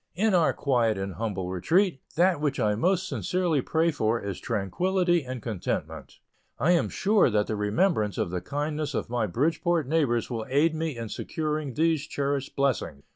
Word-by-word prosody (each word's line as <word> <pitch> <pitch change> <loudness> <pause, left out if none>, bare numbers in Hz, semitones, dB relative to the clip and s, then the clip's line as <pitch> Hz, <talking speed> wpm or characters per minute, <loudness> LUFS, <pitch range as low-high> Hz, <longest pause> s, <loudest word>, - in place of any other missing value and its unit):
In 210 +3 +2
our 170 -3 +4
quiet 120 -6 +1
and 95 0 -4
humble 95 -1 -3
retreat, 160 - +1
that 175 -2 +3
which 150 -2 0
I 105 -1 +2
most 185 - +1
sincerely 175 -6 0
pray 165 +5 +1
for 115 -5 0
is 100 -2 -5
tranquillity 175 - 0
and 130 -2 -6
contentment. 110 -7 -4 0.4
I 165 - +2
am 175 - +2
sure 205 -4 +3
that 105 -2 +1
the 110 - -3
remembrance 105 - +1
of 90 - -1
the 90 -1 -2
kindness 145 - -3
of - - -3
my 120 -3 0
Bridgeport 160 - 0
neighbors 135 -7 +1
will 115 -3 -4
aid 150 +5 +3
me 160 -4 -3
in 115 -1 -5
securing 150 -2 -3
these 160 -2 +1
cherished 140 -1 -2
blessings. 135 - -1
140 Hz, 175 wpm, -27 LUFS, 110-165 Hz, 0.4 s, our